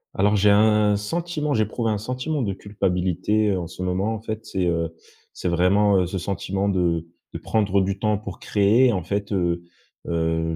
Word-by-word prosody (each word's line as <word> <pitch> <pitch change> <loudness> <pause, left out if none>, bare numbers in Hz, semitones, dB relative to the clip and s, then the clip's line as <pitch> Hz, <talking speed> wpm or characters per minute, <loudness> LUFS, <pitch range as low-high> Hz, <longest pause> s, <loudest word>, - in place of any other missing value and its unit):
Alors 105 +2 +3
j'ai 105 0 +4
un 105 0 +4
sentiment 150 +6 -2
j'éprouve 110 +2 -1
un 105 -1 +1
sentiment 130 +6 -3
de 100 -3 -1
culpabilité, 100 +1 0
heu, 95 -2 0
en 85 - -4
ce 90 - -10
moment. 95 +4 -1
En 110 - -5
fait, 110 0 -5
c'est, 95 -2 -1
heu, 85 -1 -1 0.4
c'est - - -4
vraiment, 95 +4 +3
heu, - - +1
ce 95 - -4
sentiment 95 +2 -2
de 85 -3 0 0.3
de - - -5
prendre 100 -3 +1
du 95 +1 -1
temps 105 0 +1
pour 100 -4 -8
créer. 110 +5 +3
En 95 - -1
fait, 100 +3 -3
heu 85 -3 0 0.4
heu, 80 -1 0
100 Hz, 190 wpm, -23 LUFS, 90-105 Hz, 0.4 s, j'ai